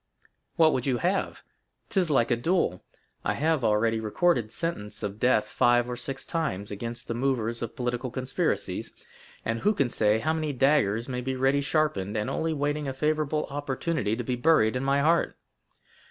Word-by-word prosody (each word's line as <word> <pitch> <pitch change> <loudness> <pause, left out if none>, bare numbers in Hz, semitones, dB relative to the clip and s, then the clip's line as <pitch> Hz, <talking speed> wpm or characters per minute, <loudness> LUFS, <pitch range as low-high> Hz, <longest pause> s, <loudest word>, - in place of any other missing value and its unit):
"What 160 -3 +5
would 130 +1 -1
you 130 -2 +2
have? 185 +6 -1 0.5
'Tis 185 -4 +1
like 125 -5 +2
a - - +5
duel. 120 - 0 0.4
I - - 0
have 155 -2 +1
already 110 +1 +2
recorded 115 - +1
sentence 110 -11 -4
of 105 0 -4
death, 110 -4 +3
five 120 +2 +3
or 125 - -3
six 130 +2 -5
times, 105 - -2
against 115 +4 -5
the - - -2
movers 120 -2 -1
of 115 - -5
political 125 +1 -2
conspiracies, 130 +2 -2 0.5
and 115 0 -1
who 210 - +2
can 135 -7 +1
say 105 0 +3
how 155 +8 0
many 155 -2 -2
daggers 125 -5 +2
may 125 -2 -3
be 130 +1 -2
ready 135 +2 +2
sharpened, 140 -10 0
and 105 - -1
only 165 0 -1
waiting 145 0 -1
a 135 - -2
favorable 155 +1 0
opportunity 145 -4 -1
to 125 - -4
be 125 +2 -1
buried 125 -4 +3
in 125 - -1
my 140 +1 +2
heart?" 165 +3 +2
130 Hz, 180 wpm, -27 LUFS, 115-150 Hz, 0.5 s, What